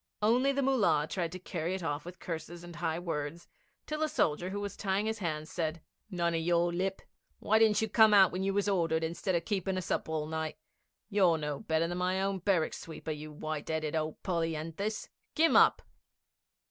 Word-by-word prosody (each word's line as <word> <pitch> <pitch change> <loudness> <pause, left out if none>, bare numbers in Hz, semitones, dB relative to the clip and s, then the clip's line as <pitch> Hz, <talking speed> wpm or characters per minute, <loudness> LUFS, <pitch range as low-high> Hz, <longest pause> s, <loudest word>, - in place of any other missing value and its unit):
Only 250 +6 +4
the 275 0 0
Mullah 215 - +3
tried 170 -1 -2
to - - -4
carry 175 -1 -3
it 190 - -5
off 145 -1 -2
with 180 +1 -9
curses 170 +1 -6
and 175 -1 -10
high 170 -1 -1
words, 165 -1 -4 0.4
till 305 0 -4
a 310 - +2
soldier 175 - +1
who 200 +2 -3
was 200 -1 -4
tying 195 +1 0
his 220 0 -2
hands 155 -4 -3
said: 165 -1 -2 0.3
'None 170 -3 0
o' - - +1
your 170 +1 +2
lip! 190 +2 -2 0.3
Why 220 +1 +2
didn't 220 -1 +4
you - - +1
come 220 0 +6
out 195 -3 +7
when 185 - -3
you 195 +1 +1
was 200 +1 0
ordered, 165 -4 +1
instead 170 +3 -1
o' 170 - +2
keepin' 190 -2 -1
us 185 - -4
awake - - 0
all 155 -1 -1
night? 160 0 -3 0.5
You're 185 -5 +4
no 150 -2 -3
better 160 +1 0
than 175 +1 -3
my 185 +1 +1
own 195 0 0
barrack 180 -3 +1
sweeper, 160 -1 -6
you 150 0 -6
white 155 0 -5
'eaded 155 -1 -1
old 155 -1 -3
polyanthus! 165 +4 -2 0.3
Kim 325 +1 +4
up!' - - +6
175 Hz, 205 wpm, -31 LUFS, 160-195 Hz, 0.5 s, out